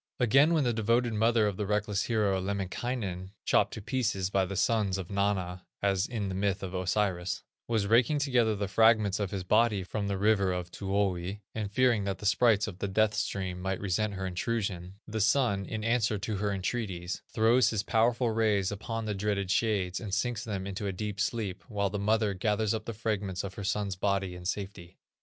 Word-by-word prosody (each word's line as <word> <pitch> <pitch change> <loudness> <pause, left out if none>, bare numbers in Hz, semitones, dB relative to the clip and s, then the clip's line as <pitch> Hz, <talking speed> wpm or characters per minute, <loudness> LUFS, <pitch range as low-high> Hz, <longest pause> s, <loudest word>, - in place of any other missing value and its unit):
Again 135 +7 +5
when 155 - +3
the 120 -2 +1
devoted 115 +2 +1
mother 110 +1 +3
of 100 -3 -1
the 105 - -2
reckless 105 -1 0
hero, 105 -5 +1
Lemminkainen, 95 0 -3
(chopped - - +3
to 110 - -8
pieces 105 -7 -1
by 95 -1 +2
the 100 +2 -5
Sons 100 -1 +1
Of 95 -1 -6
Mana, 95 -3 -1
as 100 -1 +1
in 110 -5 -3
the 95 - -3
myth 95 +1 -1
of 95 -1 -5
Osiris) 95 -1 -1 0.2
was 110 -3 +1
raking 115 +7 +4
together 125 -6 +2
the 100 0 -2
fragments 110 -1 +4
of 100 -2 -1
his 95 -1 -4
body 105 0 +3
from 100 +2 -3
the 100 -1 -1
river 100 -2 +2
of 90 -1 -4
Tuoni, 95 -1 -1
and 105 -2 -3
fearing 120 -2 +3
that 100 -1 -2
the 105 - -9
sprites 110 0 +4
of 95 -4 -7
the 100 - -1
Death 110 +2 +2
stream 95 -4 -2
might 95 0 -2
resent 100 +1 -1
her 95 0 -4
intrusion, 95 -1 -3
the 110 0 -2
Sun, 110 -3 +2
in 110 -1 -4
answer 115 -2 +1
to 105 +2 -3
her 100 +1 -1
entreaties, 95 -3 -3
throws 115 +3 +4
his 110 -2 -1
Powerful 115 +2 +2
rays 105 -4 +1
upon 115 +2 -4
the 105 - -1
dreaded 100 -1 -1
Shades, 95 -4 +1
and 105 -3 -6
sinks 110 +3 -1
them 100 -5 -4
into 100 +1 -4
a - - -1
deep 100 +1 -5
sleep, 105 -2 -2
while 100 -3 -1
the 105 - -2
mother 105 0 +2
gathers 105 +2 0
up 110 -1 -3
the 115 - -4
fragments 100 -4 -2
of 100 -1 -5
her 100 - -7
son's 100 0 -1
body 95 -1 0
in 90 0 -10
safety. 95 -2 -5
100 Hz, 200 wpm, -29 LUFS, 95-110 Hz, 0.2 s, Again